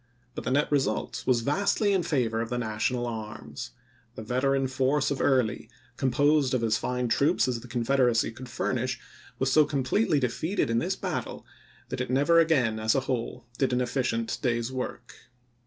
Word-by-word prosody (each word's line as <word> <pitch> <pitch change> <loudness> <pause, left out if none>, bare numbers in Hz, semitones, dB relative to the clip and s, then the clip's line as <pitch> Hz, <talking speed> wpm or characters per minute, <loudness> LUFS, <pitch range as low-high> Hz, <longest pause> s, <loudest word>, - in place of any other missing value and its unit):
But - - -7
the - - 0
net 145 +4 +1
result 135 -7 -1
was 125 -2 +3
vastly 200 - +1
in 190 - +2
favor 125 -9 0
of 115 - -4
the 125 - -2
Na 110 -3 -3
tional 120 +2 0
arms. 105 -10 -6 0.5
The 110 - -7
veteran 135 +4 +1
force 135 +2 +1
of 140 - -1
Early, 125 -4 +1 0.3
composed 135 +1 +2
of 120 - -1
as 110 -1 +2
fine 125 +2 -1
troops 140 +9 +2
as 125 -2 -1
the 120 - -12
Confederacy 120 -1 +2
could 125 +2 -10
furnish, 130 +1 -2 0.4
was 135 0 0
so 155 - +7
completely 145 - +1
defeated 140 - -1
in 115 - +2
this - - -1
battle - - -4 0.4
that - - -3
it - - -3
never 145 +6 +4
again 130 -10 +2
as 110 0 +2
a 135 - +2
whole 125 -1 -3
did 135 -2 +1
an 125 - +2
efficient 120 -2 -1
day's 120 0 0
work. 125 -2 -5
125 Hz, 180 wpm, -27 LUFS, 115-140 Hz, 0.5 s, so